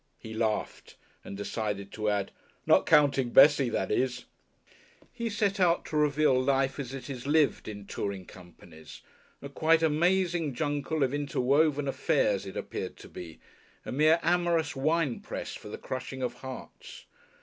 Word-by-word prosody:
He 110 - -9
laughed 110 -1 -3 0.3
and 100 - -8
decided 100 -1 -4
to 105 -1 -2
add, 100 -1 -1 0.3
"Not - - +4
counting 140 -5 +4
Bessie, 140 0 +6
that - - -2
is." 125 -1 -1 0.9
He 235 -1 -3
set 205 -1 0
out 175 -2 +2
to 155 - -6
reveal 150 -3 +3
Life 135 +1 +1
as 130 -3 -5
it 135 -1 -7
is 135 -2 -7
lived 150 -1 +2
in 105 -2 -7
touring 100 -2 -4
companies, 85 -3 -14 0.4
a - - -5
quite 160 +3 +2
amazing 170 -1 +1
jungle 145 +1 -1
of 130 0 0
interwoven 145 +1 +1
"affairs" 135 - 0
it - - -7
appeared - - -5
to - - -13
be, 80 -3 -9 0.5
a - - -5
mere 155 +5 +4
amorous 170 -3 +1
winepress 150 -1 -1
for - - -9
the - - -6
crushing 130 0 -6
of 120 -1 -2
hearts. 130 +1 -10
140 Hz, 150 wpm, -29 LUFS, 120-155 Hz, 0.9 s, Bessie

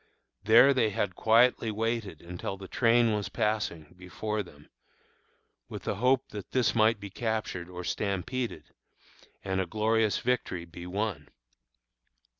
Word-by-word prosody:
There 115 +6 +7
they 115 -5 +2
had 105 -3 -2
quietly 115 +3 +3
waited 110 -6 -3
until 90 +3 -5
the 95 0 -9
train 115 0 +3
was 105 -1 -2
passing 95 -8 -2
before 105 +4 -4
them, 75 -6 -14 1.0
with - - -7
the - - -2
hope 130 +3 +2
that 105 -2 -8
this 120 -6 +2
might 110 -1 +3
be 100 -1 -8
captured 110 -5 -3
or 90 0 -7
stampeded, 110 +7 -3 0.7
and 95 0 -1
a 95 - -3
glorious 110 +2 +1
victory 120 -8 -1
be 85 +1 -10
won. 95 -5 -3
105 Hz, 135 wpm, -29 LUFS, 90-115 Hz, 1.0 s, There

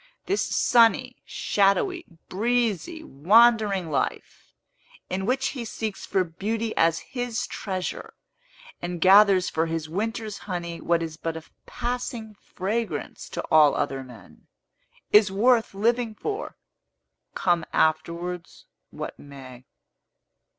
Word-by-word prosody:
This 395 +2 0
sunny, 245 +1 +3
shadowy, 335 - +1 0.2
breezy, 240 - -1
wandering 205 - +3
life, 140 - -3 0.6
in 190 +1 -2
which 265 +2 +1
he 255 -4 -5
seeks 220 -2 -5
for 190 - +2
beauty 215 +6 -3
as 165 0 +3 0.2
his 245 -3 -2
treasure, 185 -3 -5 0.7
and 175 0 -4
gathers 195 +1 +6
for 160 +1 0
his 165 -1 -3
winter's 215 +4 -3
honey 170 -2 -4
what 170 0 +1
is 160 -1 -6
but 165 0 -4
a 160 - -9 0.2
passing 240 -2 -4
fragrance 210 +3 -4
to - - -4
all 155 -2 +6
other 135 -2 -2
men, 125 -4 -15 0.6
is 210 -2 +6
worth 225 +1 +2
living 230 +2 0
for, 425 - -5 0.8
come 175 -2 +1
afterwards 170 +2 -1 0.2
what - - -7
may. 130 -3 -12
195 Hz, 115 wpm, -25 LUFS, 165-230 Hz, 0.8 s, gathers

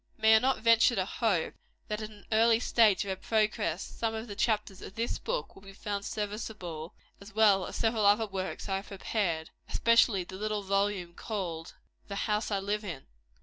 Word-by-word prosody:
May 220 0 +6
I - - +7
not 260 +3 +2
venture 230 +1 +5
to 185 - 0
hope, 200 -5 0 0.3
that 210 0 -3
at 215 - -5
an 210 -2 -16
early 225 +1 +5
stage 220 -4 +3
of - - -5
her - - -1
progress, 210 -3 0
some 225 -1 -3
of 220 +2 -5
the 205 - -7
chapters 210 -3 0
of 190 - -9
this 230 +1 -2
book - - -3
will - - -15
be 195 0 -12
found 200 0 -4
serviceable, 205 -6 -5 0.2
as 200 +1 -13
well 205 -4 +4
as - - -7
several 225 -2 +2
other 210 +2 +4
works 190 -1 -5
I 195 -1 0
have 195 - -8
prepared, 190 -5 -2 0.2
especially 230 -4 +4
the 185 +2 -9
little 210 0 -2
volume 195 -2 0
called 175 -6 -5 0.3
the 200 - -5
"House 210 +1 -1
I 205 - 0
Live 205 +2 -2
In?" 165 -9 -6
205 Hz, 195 wpm, -30 LUFS, 195-220 Hz, 0.3 s, I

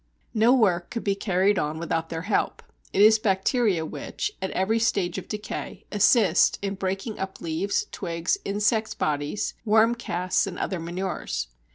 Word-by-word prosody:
No 225 +1 +4
work 190 -9 +3
could 230 - -4
be 200 - +1
carried 195 0 +1
on 150 +1 -2
without 165 0 -2
their 165 0 -4
help; 210 - -1 0.3
it 200 - +4
is 220 +1 +7
bacteria 195 -2 +1
which, 420 - -4
at 190 - -1
every 210 +5 +1
stage 200 -6 0
of - - -11
decay, 210 -1 -6
assist 205 -3 +4
in 200 0 -1
breaking 195 +3 -3
up 190 0 -5
leaves, 170 +5 -1
twigs, 170 - -2
insects' 210 +2 0
bodies, 150 +6 -1
worm 220 +1 +4
casts, 185 -6 -1
and 180 - -6
other 185 - -2
manures. 175 - -3
195 Hz, 160 wpm, -25 LUFS, 175-215 Hz, 0.3 s, is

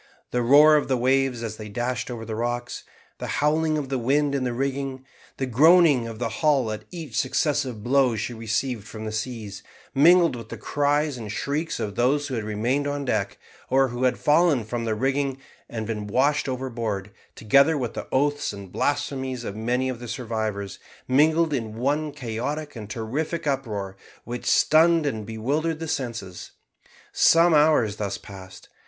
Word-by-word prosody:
The 125 - 0
roar 150 +5 +7
of 145 - -1
the 130 - +1
waves 130 -1 +1
as 110 -2 -5
they 105 -1 -8
dashed 125 +4 -3
over 115 -2 -6
the 110 - -5
rocks, 120 +2 -3 0.3
the - - -4
howling 155 +1 +2
of 140 -3 -4
the 135 -2 -1
wind 140 +4 +1
in 140 -2 0
the 125 - -1
rigging, 135 +1 -3 0.3
the 135 - -1
groaning 145 0 +5
of 115 -1 -7
the 120 +1 -2
hull 140 -7 +3
at 110 - -6
each 160 -9 -8
successive 130 -4 0
blow 130 -1 +3
she 110 +3 -3
received 115 0 -2
from 110 +1 -8
the 110 - -3
seas, 110 -2 -5 0.3
mingled 170 +1 +5
with 115 -3 -9
the - - -6
cries 145 -1 0
and 110 -3 -6
shrieks 150 +9 -2
of 105 -3 -3
those 135 +7 +1
who - - -5
had 115 -3 -2
remained 120 +7 -1
on 145 0 -3
deck, 105 -5 -1 0.3
or 135 0 +3
had 125 +1 0
fallen 150 -4 +3
from 115 +2 -4
the 110 -1 0
rigging 135 +2 0 0.3
and 110 -2 -4
been 105 -2 -4
washed 140 +6 +1
overboard, 115 -6 -3 0.2
together 140 +8 +4
with 120 -4 -3
the - - -6
oaths 145 +2 +1
and 100 -3 -10
blasphemies 135 -3 -2
of 100 - -5
many 120 +4 -1
of 130 -2 -4
the 120 - -8
survivors, 110 -4 -4 0.3
mingled 155 +4 +3
in 115 -5 -3
one 145 +5 0
chaotic 145 +3 -4
and 105 -3 -8
terrific 140 +10 -3
uproar, 110 -9 -2 0.3
which 120 0 -6
stunned 155 +2 +4
and 110 -7 -3
bewildered 145 +9 -1
the 165 0 -5
senses. 115 - -5 0.6
Some 165 +1 +5
hours 150 -9 +3
thus 100 -2 -3
passed. 95 -2 -12
130 Hz, 175 wpm, -24 LUFS, 110-145 Hz, 0.6 s, roar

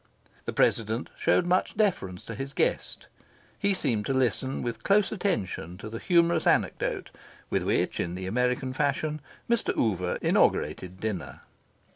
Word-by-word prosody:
The - - -2
President 115 +2 +1
showed 180 - +2
much 180 +3 +1
deference 110 - 0
to 115 - -6
his 135 +5 -5
guest. - - -1 0.5
He 200 -1 +2
seemed 115 - 0
to 135 - 0
listen 130 +1 0
with 120 -1 -4
close 200 0 +3
attention 100 - -2
to 105 +2 -7
the 115 - -5
humorous 170 -2 +3
anecdote - - +1 0.4
with - - +2
which, - - 0
in 85 +1 -2
the 95 0 -5
American 125 +5 0
fashion, 150 +2 0 0.3
Mr. 235 -1 +1
Oover 90 -5 0
inaugurated 90 0 +1
dinner. 105 -4 -4
125 Hz, 145 wpm, -28 LUFS, 105-170 Hz, 0.5 s, close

